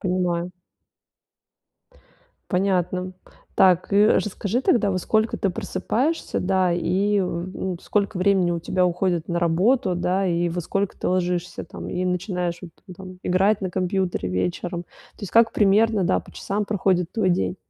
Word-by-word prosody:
Понимаю. 180 -1 -1 2.0
Понятно. 185 -1 0 0.4
Так, 185 0 +3
и 205 +1 +6
расскажи 210 +4 0
тогда, 210 -6 +2
во 185 - 0
сколько 220 +4 0
ты 195 - 0
просыпаешься, 235 - -2
да 185 -1 +1
и, 195 +4 +1
в 180 0 -3
ну, 185 -2 -3
сколько 200 -1 -1
времени 185 -1 +2
у 170 - -1
тебя 180 +2 +1
уходит 175 -1 -1
на 170 0 -1
работу, 185 +6 +2
да 185 +2 0
и 175 0 +1
во 175 +1 -3
сколько 195 +3 -2
ты - - -3
ложишься 180 -1 -1
там - - -9
и 180 +1 -2
начинаешь 180 -1 -2
вот 170 - -9 0.3
там 185 -1 -10
играть 195 +4 +2
на 185 -2 -3
компьютере 185 - -1
вечером? 175 - -2
То - - -26 0.4
есть 195 - -5
как 230 0 +5
примерно, 210 0 +3
да, - - +2
по - - -12
часам 205 +1 -3
проходит 185 -4 0
твой 215 -5 +1
день? 180 +1 0
185 Hz, 155 wpm, -23 LUFS, 175-200 Hz, 2.0 s, и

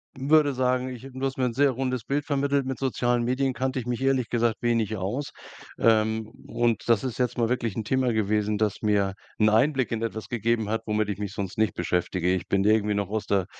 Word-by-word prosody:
w 135 +1 -5
würde 150 -2 +5
sagen, 130 0 0
ich 125 -2 -8
du 130 - -8
hast 135 0 -2
mir 130 - +1
'n 120 - -1
sehr 140 +2 +3
rundes 130 -2 -2
Bild 145 +4 -1
vermittelt. 140 -1 0
Mit 130 0 -3
sozialen 120 -2 0
Medien 130 +2 0
kannte 130 +2 -2
ich 125 - -6
mich 125 0 -3
ehrlich 135 -3 +1
gesagt 115 -2 +1
wenig 115 -3 0
aus. 105 +10 -3 0.5
Ähm, 110 -1 +2 0.2
und 120 -1 0
das 115 -4 +4
ist 125 -3 -3
jetzt 125 0 0
mal 115 - +2
wirklich 115 -4 -1
'n 110 - -2
Thema 130 0 +1
gewesen, 105 -1 0
das 105 -2 -1
mir 100 -2 +1 0.3
'n 110 0 +5
Einblick 130 +3 +2
in 115 -1 -2
etwas 110 -1 -4
gegeben 115 -2 0
hat, 110 +1 -1
womit 105 0 0
ich 100 - -3
mich 105 -1 -3
sonst 100 -3 -5
nicht 110 -1 +2
beschäftige. 90 0 0
Ich 95 0 -3
bin 100 0 +1
irgendwie 105 -1 +3
noch 100 -2 -2
aus 110 0 -2
der 100 -2 +1
115 Hz, 230 wpm, -26 LUFS, 105-130 Hz, 0.5 s, würde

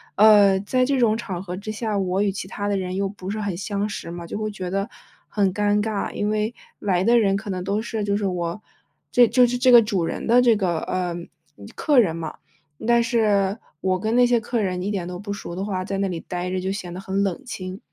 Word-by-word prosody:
呃， 205 -2 +6
在 255 +5 +1
这 275 0 +1
种 220 -2 +3
场 190 -6 -5
合 180 -1 -5
之 205 +3 -6
下， 215 -2 -2
我 190 +1 0
与 200 - +1
其 190 -1 -6
他 205 +1 -4
的 200 -1 +1
人 185 0 -3
又 195 0 0
不 195 -1 -8
是 215 +1 -3
很 200 -4 -2
相 200 +2 -2
识 185 - -6
嘛， 170 0 -7
就 205 - -5
会 215 0 -2
觉 185 -3 -6
得 195 +1 -1 0.4
很 195 -3 +1
尴 205 0 +2
尬。 215 -2 -2
因 210 - -2
为， 215 +2 -1 0.2
来 185 -2 +1
的 235 +2 +5
人 195 -3 +2
可 205 -1 -5
能 180 -1 -3
都 200 +2 -1
是， 220 -2 -3
就 200 0 0
是 205 - -2
我 175 0 -2 0.5
这 245 -1 +6
就 250 +1 +5
是 245 +1 -1
这 255 0 +5
个 235 -2 +9
主 195 -5 -1
人 - - -3
的 245 +2 +5
这 235 -3 +5
个， 175 -5 0
呃， 180 -2 -2 0.6
客 290 -4 +3
人 170 -8 +2
嘛， 160 -2 -5 0.5
但 235 0 +5
是 210 -4 +2 0.2
我 185 -1 +1
跟 220 +3 -1
那 245 - +6
些 240 -1 +3
客 235 0 -1
人 180 -2 -1
一 200 +3 -2
点 180 -4 -3
都 180 0 -5
不 205 0 -6
熟 175 -3 -6
的 190 - -3
话， 185 -2 -3
在 195 0 -3
那 200 - +1
里 170 -2 -4
呆 180 +1 -4
着 185 - -1
就 190 +1 -3
显 180 -3 -5
得 185 - -6
很 195 +1 -1
冷 195 +5 -2
清。 185 -4 -6
200 Hz, 270 characters per minute, -23 LUFS, 185-215 Hz, 0.6 s, 个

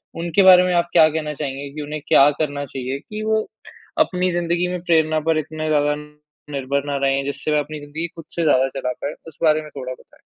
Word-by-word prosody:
उनके 170 +3 +1
बारे 185 -1 +8
में 180 0 +1
आप 170 0 +1
क्या 160 -2 +7
कहना 155 -1 -3
चाहेंगे 140 -1 -5
कि 150 - -4
उन्हें 150 0 -5
क्या 140 +2 +6
करना 145 -2 -2
चाहिए 130 +1 -5
कि 215 +6 -7
वो, 220 0 0 0.5
अपनी 180 -1 +2
ज़िंदगी 175 +1 0
में 180 -1 -4
प्रेरणा 160 -3 +2
पर 160 - +3
इतने 155 +1 -4
ज़्यादा 150 -1 +2 0.6
निर्भर 140 0 -1
ना 145 -1 -2
रहें 135 0 +1
जिससे 140 +2 -3
वह 150 - +3
अपनी 150 +1 -5
ज़िंदगी 155 +4 -5
खुद 165 - -10
से 170 - 0
ज़्यादा 135 -3 +4
चला 125 - -2
पाए? 145 - -3
उस 160 - -12
बारे 155 -1 +4
में 155 - -11
थोड़ा 130 -2 -5
बताएँ। - - -20
155 Hz, 220 wpm, -21 LUFS, 140-170 Hz, 0.6 s, बारे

